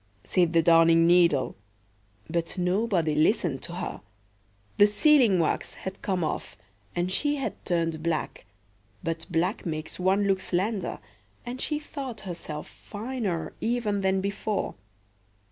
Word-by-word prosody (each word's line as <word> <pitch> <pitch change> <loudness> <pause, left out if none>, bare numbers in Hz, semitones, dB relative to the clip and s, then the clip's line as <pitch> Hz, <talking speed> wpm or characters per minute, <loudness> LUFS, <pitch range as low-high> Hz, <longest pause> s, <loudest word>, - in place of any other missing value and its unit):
said 175 -3 +2
the 165 -1 +4
Darning 165 0 +6
needle. 170 -6 +4 0.7
But 170 +2 -2
nobody 180 -3 +1
listened 155 +1 +2
to - - -7
her. - - -5 0.8
The 205 - +8
sealing 240 - +5
wax 165 -3 0
had 190 0 -7
come 185 -3 -1
off, 155 - -3 0.4
and 175 +1 0
she 290 +9 +1
had 275 - -4
turned 165 -3 0
black; 160 - -2 0.6
but 165 -1 -3
black 175 +4 0
makes 155 -2 -5
one 190 +3 +3
look 195 -1 +2
slender, 190 +2 -1 0.5
and 250 +2 -5
she 300 - 0
thought 275 -5 -6
herself 165 -5 -6
finer 205 -8 -4
even 225 -4 0
than 190 0 +2
before. 200 +1 -2
185 Hz, 130 wpm, -27 LUFS, 165-210 Hz, 0.8 s, The